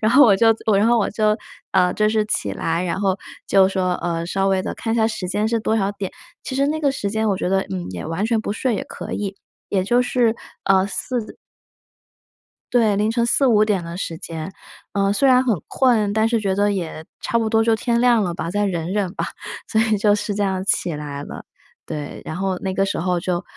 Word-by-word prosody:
然 220 +2 +2
后 285 +2 +8
我 200 -4 +6
就 225 +2 +5 0.2
然 205 - +3
后 235 0 +4
我 210 - 0
就， 215 0 +2 0.4
呃， 180 -1 +3
就 215 0 +2
是 215 0 +1
起 100 - -1
来， 165 - -1
然 180 +2 -2
后 195 -1 +1 0.3
就 190 -1 +5
说， 185 -2 0
呃， 170 -1 -2
稍 195 +3 0
微 190 -1 +2
地 - - -3
看 225 - -2
一 - - +1
下 220 - +3
时 200 -4 -4
间 210 +3 0
是 230 - +1
多 220 0 0
少 200 -1 +1
点。 200 -2 -5 0.3
其 260 - -4
实 275 - +2
那 310 +1 -1
个 285 -3 +1
时 200 -6 -3
间 220 +1 0
我 195 - +1
觉 180 - -2
得， 190 0 +2
嗯， 90 -1 -4
也 90 - -6
完 165 +5 -2
全 225 -1 +1
不 210 - -3
睡 230 0 -1
也 - - -4
可 - - -8
以， 200 -1 -3 0.3
也 190 -2 +1
就 240 +6 +2
是， 245 -2 +1 0.3
呃， 190 0 +3
4 225 +3 -4 1.4
对， 220 -4 +4
凌 210 +2 +1
晨 235 0 +1
4:00-5:00 215 -7 +3
的 170 +1 -6
时 165 -3 -4
间， 165 -1 -6 0.4
呃， 200 0 +2
虽 275 +7 +2
然 255 0 +5
很 220 - 0
困， 225 -6 +2
但 220 +1 +2
是 230 - +2
觉 195 -3 0
得 205 +1 +2
也 170 -5 -4 0.2
差 235 - 0
不 225 -1 0
多 225 0 +3
就 225 0 +3
天 235 +1 0
亮 235 -3 +4
了 175 - -2
吧， 170 - -4
再 205 +3 0
忍 175 -1 -2
忍 195 -4 -1
吧， - - -2 0.4
所 220 -1 +2
以 220 -1 +2
就 205 +1 +3
是 210 0 -3
这 205 - -2
样 190 -2 0
起 180 -3 0
来 145 -1 -5
了。 - - -8 0.4
对， 145 -1 -6
然 155 - -5
后 190 -1 -1
那 190 -1 -3
个 195 0 +1
时 - - -2
候 180 +1 0
就 175 0 -2
205 Hz, 245 characters per minute, -21 LUFS, 185-225 Hz, 1.4 s, 后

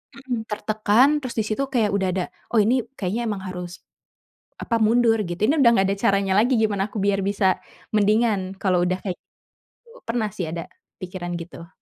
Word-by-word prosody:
Mhm, 245 -5 -5
tertekan, 215 +4 +2
terus 255 -4 -6
di 220 - +1
situ 225 +6 -2
kayak 230 -6 +1
udah 195 -2 0
ada, 185 - 0 0.3
"Oh, 225 - +5
ini 250 +4 +3 0.2
kayaknya 220 +5 -2
emang 200 -3 -3
harus, 180 -1 -7 0.7
apa, 230 - -2
mundur," 225 0 +3
gitu, 175 -3 -4
"ini 285 - +3
udah 235 - +7
nggak 195 - +3
ada - - -6
caranya 195 -1 +2
lagi 245 +4 +3
gimana 210 -2 0
aku 215 - -7
biar 200 0 +1
bisa 190 -1 +1 0.3
mendingan 210 -2 +2
kalo 185 -3 +1
udah 185 +1 0
kayak 185 -3 -3 0.5
gitu." 475 +1 -21
Pernah 230 -2 -1
sih 190 -4 -4
ada 165 +1 -6 0.3
pikiran 175 -1 -5
gitu. 170 0 -10
205 Hz, 185 wpm, -23 LUFS, 190-230 Hz, 0.7 s, udah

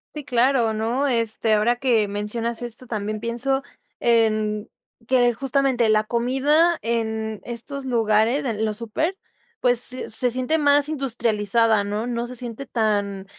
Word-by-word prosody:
Sí, 300 - -5
claro, 245 -3 +2
¿no? 235 +6 0
Este, 230 -3 +1
ahora 235 +3 +2
que 235 -5 +2
mencionas 225 +4 -3
esto, 240 +1 -7
también 215 -2 -3
pienso 245 +4 -1 0.4
en, 215 -2 +1 0.4
que 245 -2 +3
justamente 265 -2 +1
la 215 0 +4
comida 270 +9 +2
en 220 -2 -2
estos 245 +4 -6
lugares, 230 +2 +2
en 220 -3 -2
los 215 -1 -1
súper, 310 - -2 0.4
pues, 245 0 +1
s 255 - -4
se 245 +3 +1
siente 255 +6 0
más 290 0 +4
industrializada, 230 -6 +1
¿no? 210 +3 -3
No 240 -1 -3
se 250 - -8
siente 245 +2 -6
tan 205 -4 -1
235 Hz, 145 wpm, -23 LUFS, 220-255 Hz, 0.4 s, la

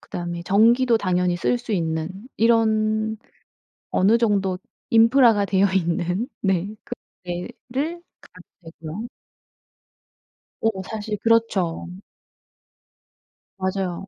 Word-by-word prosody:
그다음에 175 -1 -5
전기도 230 +5 +4
당연히 180 -2 +1
쓸 245 +7 0
수 240 -2 -6
있는 160 -2 -1 0.3
이런 220 -1 +2 0.7
어느 210 +5 +3
정도 200 -5 +1 0.3
인프라가 230 -2 +5
되어 195 0 +3
있는 180 +3 0 0.2
네 195 +1 0
그런 - - -7 0.3
데를 255 - -5 0.6
가면 165 - -11
되고요. 170 +9 -6 1.5
어 225 - +3 0.2
사실 215 -1 -4
그렇죠. 225 -8 +1 1.7
맞아요. 190 -1 -2
205 Hz, 200 characters per minute, -23 LUFS, 180-230 Hz, 1.7 s, 인프라가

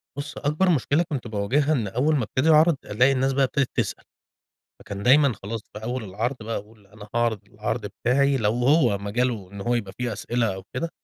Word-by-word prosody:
بُصّ 140 0 -6
أكبر 150 +6 +1
مشكلة 155 0 +2
كنت 135 -5 -3
باواجهها 115 +8 0
إن 115 -7 0
أول 135 +10 +1
ما 130 - +1
ابتدي 130 +8 0
أعرِض 155 +1 +6
ألاقي 125 +6 +3
الناس 135 0 +1
بقي 135 +1 +2
ابتدت 135 0 +1
بتسأل. - - -2 0.8
فكان 100 0 -7
دايمًا 140 +1 +5
خلاص 110 +2 -4
في 105 - -8
أول 125 +1 -3
العرض 110 +7 -2
بقى 115 +1 -3
أقول 105 0 -12
أنا 105 +1 -13
هاعرض 120 -2 +1
العرض - - -4
بتاعي، 140 +3 +1
لو 105 -3 +1
هو 125 -2 +3
مجالُه 105 -1 -2
إن 100 -1 -8
هو 120 +4 0
يبقى 105 -5 -3
فيه 125 -2 -2
أسئلة 115 -1 -1
أو 95 - -9
كده، 165 +6 -2
120 Hz, 200 wpm, -24 LUFS, 105-140 Hz, 0.8 s, أعرِض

